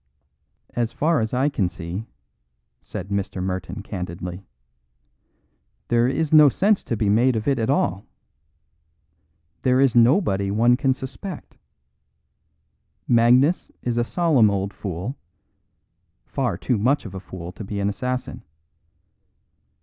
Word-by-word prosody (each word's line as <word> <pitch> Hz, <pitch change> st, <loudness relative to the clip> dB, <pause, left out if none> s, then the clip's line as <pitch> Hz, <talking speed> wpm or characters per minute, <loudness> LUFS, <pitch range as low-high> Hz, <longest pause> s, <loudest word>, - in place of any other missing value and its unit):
"As 120 Hz, -1 st, -1 dB
far 155 Hz, +5 st, +1 dB
as 110 Hz, -1 st, -1 dB
I 130 Hz, +3 st, +1 dB
can 105 Hz, -11 st, 0 dB
see," 90 Hz, +6 st, -6 dB, 0.7 s
said 95 Hz, -, -7 dB
Mr. 100 Hz, -1 st, -2 dB
Merton 95 Hz, +1 st, -4 dB
candidly, 90 Hz, -1 st, -6 dB, 1.4 s
"there 120 Hz, 0 st, +3 dB
is 155 Hz, +4 st, -1 dB
no 150 Hz, -2 st, +8 dB
sense 200 Hz, -, +2 dB
to 115 Hz, -, -2 dB
be 105 Hz, -, 0 dB
made 120 Hz, +5 st, +3 dB
of 110 Hz, +2 st, -3 dB
it 135 Hz, -3 st, +2 dB
at 110 Hz, -, -1 dB
all. 100 Hz, -8 st, 0 dB, 1.5 s
There 130 Hz, 0 st, +3 dB
is 135 Hz, -3 st, +4 dB
nobody 115 Hz, -, +3 dB
one 115 Hz, +4 st, +4 dB
can 135 Hz, 0 st, +1 dB
suspect. 140 Hz, +7 st, -8 dB, 1.5 s
Magnus 125 Hz, +8 st, +4 dB
is 120 Hz, -1 st, -1 dB
a -, -, +2 dB
solemn 145 Hz, -, +3 dB
old 100 Hz, 0 st, -2 dB
fool; 100 Hz, -, -5 dB, 1.1 s
far -, -, -2 dB
too 120 Hz, -5 st, -1 dB
much 130 Hz, +6 st, +1 dB
of 100 Hz, -, -8 dB
a 95 Hz, -, -5 dB
fool 90 Hz, -2 st, -8 dB
to 105 Hz, -, -9 dB
be 100 Hz, 0 st, -5 dB
an 100 Hz, -, 0 dB
assassin. 125 Hz, +5 st, -3 dB
115 Hz, 130 wpm, -23 LUFS, 100-130 Hz, 1.5 s, no